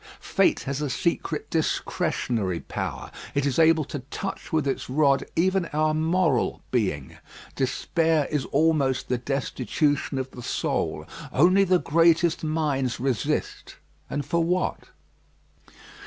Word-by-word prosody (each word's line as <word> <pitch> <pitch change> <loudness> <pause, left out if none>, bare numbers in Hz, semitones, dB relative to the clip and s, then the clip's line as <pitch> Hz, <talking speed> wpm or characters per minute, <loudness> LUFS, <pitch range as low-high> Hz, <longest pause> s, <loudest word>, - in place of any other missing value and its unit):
Fate - - +2
has 140 +1 -3
a 150 - -1
secret 160 +2 -1
discretionary 115 - -1
power. - - -5 0.2
It 140 0 +1
is 140 0 0
able 160 -1 +5
to 145 - -5
touch 195 +5 -5
with 155 -4 +1
its 135 - -2
rod 140 0 +3
even 185 +1 +2
our 155 +1 +1
moral 160 -3 +1
being. 95 - -1 0.4
Despair 160 +3 +1
is 150 -3 0
almost 145 -4 +1
the 125 -1 0
destitution 135 +2 -1
of 130 0 -3
the 125 - -9
soul. - - -2 0.3
Only 185 +7 +5
the 185 -1 +4
greatest 165 +1 +3
minds 150 -5 -1
resist, 130 -4 -2 0.3
and 145 -1 -3
for 170 +3 +1
what? 180 +2 -1
150 Hz, 125 wpm, -25 LUFS, 130-165 Hz, 0.4 s, able